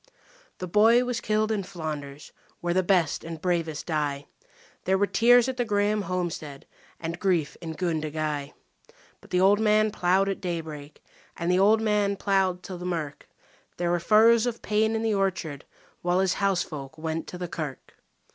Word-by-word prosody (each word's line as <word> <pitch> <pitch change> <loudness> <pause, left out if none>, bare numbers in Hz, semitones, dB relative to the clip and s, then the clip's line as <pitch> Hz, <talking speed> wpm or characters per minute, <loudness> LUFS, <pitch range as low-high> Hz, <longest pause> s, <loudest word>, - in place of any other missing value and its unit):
The 185 - -5
boy 225 +6 +5
was 245 -2 -2
killed 215 +1 0
in 210 -2 0
Flanders, 155 -6 -7 0.3
where 175 0 -1
the 185 - +3
best 180 -4 +1
and 165 -1 -7
bravest 165 -3 -1
die. 145 -3 -2 0.6
There 190 +1 +2
were 205 - +3
tears 240 +3 +5
at 260 -1 -3
the 245 - +1
Grahame 210 -1 +1
homestead 170 -6 -4 0.3
and 170 +1 -5
grief 175 -7 0
in 160 -1 -6
Gundagai; 155 -4 -2 0.7
But - - -18
the 180 - +1
old 195 +2 +5
man 215 0 +3
ploughed 190 +1 +2
at 195 - -3
daybreak 160 -5 -6 0.3
and 170 +1 0
the 180 - +3
old 215 +3 +4
man 210 -2 +1
ploughed 190 -3 +1
till 185 -3 -7
the - - -7
mirk 165 -5 -4 0.5
There 175 0 0
were 175 - +1
furrows 225 +5 +5
of 235 -1 -4
pain 220 +1 +1
in 225 - -1
the 225 -1 +1
orchard 180 -7 -2 0.4
while 175 +1 +1
his 190 -2 +1
housefolk 160 -7 -2
went 160 +1 -4
to 180 - -7
the 180 0 -4
kirk. 155 -5 -6
180 Hz, 175 wpm, -26 LUFS, 160-205 Hz, 0.7 s, boy